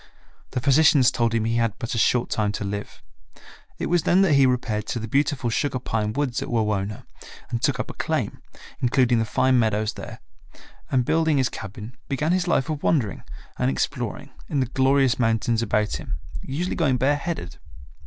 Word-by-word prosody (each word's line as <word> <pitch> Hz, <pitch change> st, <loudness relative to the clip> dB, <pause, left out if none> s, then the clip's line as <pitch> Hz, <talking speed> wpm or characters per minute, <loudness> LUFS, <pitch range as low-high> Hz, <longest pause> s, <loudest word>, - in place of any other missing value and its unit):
The -, -, -2 dB
physicians 140 Hz, 0 st, +5 dB
told 115 Hz, -1 st, 0 dB
him 110 Hz, -1 st, +1 dB
he 115 Hz, +1 st, 0 dB
had 115 Hz, -2 st, +1 dB
but 115 Hz, -3 st, -4 dB
a 115 Hz, -, 0 dB
short 120 Hz, +2 st, +2 dB
time 105 Hz, -2 st, +1 dB
to 105 Hz, -, -3 dB
live. 100 Hz, +1 st, -6 dB, 0.7 s
It -, -, -3 dB
was 175 Hz, 0 st, +2 dB
then 185 Hz, +5 st, +4 dB
that 180 Hz, -6 st, +3 dB
he 140 Hz, -1 st, +5 dB
repaired 110 Hz, -4 st, -1 dB
to -, -, -2 dB
the 110 Hz, -, -5 dB
beautiful 135 Hz, -1 st, 0 dB
sugar 135 Hz, +3 st, 0 dB
pine 110 Hz, -3 st, -2 dB
woods 130 Hz, 0 st, -1 dB
at -, -, -5 dB
Wawona 105 Hz, -3 st, -1 dB, 0.5 s
and 115 Hz, -, -2 dB
took -, -, +1 dB
up -, -, -3 dB
a -, -, -11 dB
claim, -, -, -2 dB, 0.4 s
including 125 Hz, -1 st, +3 dB
the 115 Hz, -, +1 dB
fine 130 Hz, +3 st, +2 dB
meadows 110 Hz, -1 st, +1 dB
there, -, -, -9 dB, 0.7 s
and 125 Hz, -2 st, +1 dB
building 160 Hz, 0 st, +2 dB
his 130 Hz, -2 st, +2 dB
cabin, 105 Hz, +4 st, -8 dB
began 150 Hz, +4 st, 0 dB
his 180 Hz, 0 st, +1 dB
life 135 Hz, -6 st, +2 dB
of 155 Hz, -2 st, -3 dB
wandering 120 Hz, -, 0 dB, 0.4 s
and 65 Hz, -, +2 dB
exploring 65 Hz, -, -3 dB, 0.2 s
in 145 Hz, -, 0 dB
the 130 Hz, -, +2 dB
glorious 130 Hz, 0 st, +2 dB
mountains 115 Hz, 0 st, +1 dB
about 105 Hz, -1 st, 0 dB
him, 65 Hz, -, -6 dB, 0.2 s
usually 165 Hz, +7 st, -3 dB
going 140 Hz, -7 st, +2 dB
bare 135 Hz, +4 st, +2 dB
headed. 145 Hz, -, -5 dB
125 Hz, 190 wpm, -24 LUFS, 110-140 Hz, 0.7 s, physicians